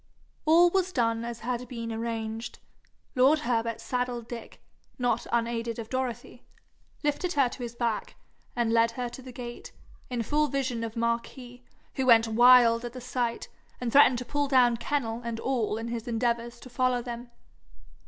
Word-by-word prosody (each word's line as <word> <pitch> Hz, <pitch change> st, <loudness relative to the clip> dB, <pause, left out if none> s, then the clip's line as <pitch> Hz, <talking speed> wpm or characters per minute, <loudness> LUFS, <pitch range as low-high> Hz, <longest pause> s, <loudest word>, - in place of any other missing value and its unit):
All 340 Hz, +2 st, +6 dB
was 375 Hz, -1 st, +1 dB
done 230 Hz, -5 st, 0 dB
as 235 Hz, 0 st, -6 dB
had 245 Hz, +1 st, -3 dB
been 230 Hz, -1 st, -5 dB
arranged. 225 Hz, 0 st, -4 dB, 0.6 s
Lord 265 Hz, +5 st, +5 dB
Herbert 230 Hz, -3 st, -1 dB
saddled 245 Hz, -2 st, -3 dB
Dick, 240 Hz, -1 st, -9 dB, 0.4 s
not 245 Hz, -1 st, 0 dB
unaided 230 Hz, -1 st, -1 dB
of 225 Hz, -1 st, -7 dB
Dorothy, 260 Hz, -2 st, -4 dB, 0.6 s
lifted 295 Hz, +5 st, 0 dB
her 275 Hz, -3 st, +3 dB
to 255 Hz, -, -9 dB
his 240 Hz, -1 st, -5 dB
back, 235 Hz, -3 st, -2 dB, 0.4 s
and 235 Hz, -2 st, +1 dB
led 230 Hz, 0 st, +4 dB
her 245 Hz, -1 st, -3 dB
to 240 Hz, +2 st, -10 dB
the 255 Hz, 0 st, -10 dB
gate, 240 Hz, -1 st, -8 dB, 0.4 s
in 245 Hz, -2 st, -2 dB
full 300 Hz, +5 st, +1 dB
vision 255 Hz, -5 st, -2 dB
of 225 Hz, 0 st, -5 dB
Marquis, 240 Hz, +2 st, -3 dB, 0.4 s
who 265 Hz, -1 st, 0 dB
went 230 Hz, -2 st, +6 dB
wild 235 Hz, 0 st, +6 dB
at 240 Hz, -1 st, -6 dB
the 255 Hz, -, -7 dB
sight, 245 Hz, -1 st, -2 dB, 0.3 s
and 245 Hz, -2 st, -2 dB
threatened 270 Hz, -2 st, +6 dB
to 250 Hz, -, -5 dB
pull 290 Hz, +2 st, -1 dB
down 250 Hz, -3 st, +4 dB
kennel 235 Hz, -3 st, -2 dB
and 230 Hz, -1 st, -4 dB
all 235 Hz, -5 st, -1 dB
in 225 Hz, +1 st, -4 dB
his 235 Hz, -1 st, -5 dB
endeavours 235 Hz, 0 st, -1 dB
to 255 Hz, -, -11 dB
follow 250 Hz, -1 st, +1 dB
them. 240 Hz, 0 st, -7 dB
240 Hz, 170 wpm, -28 LUFS, 230-255 Hz, 0.6 s, All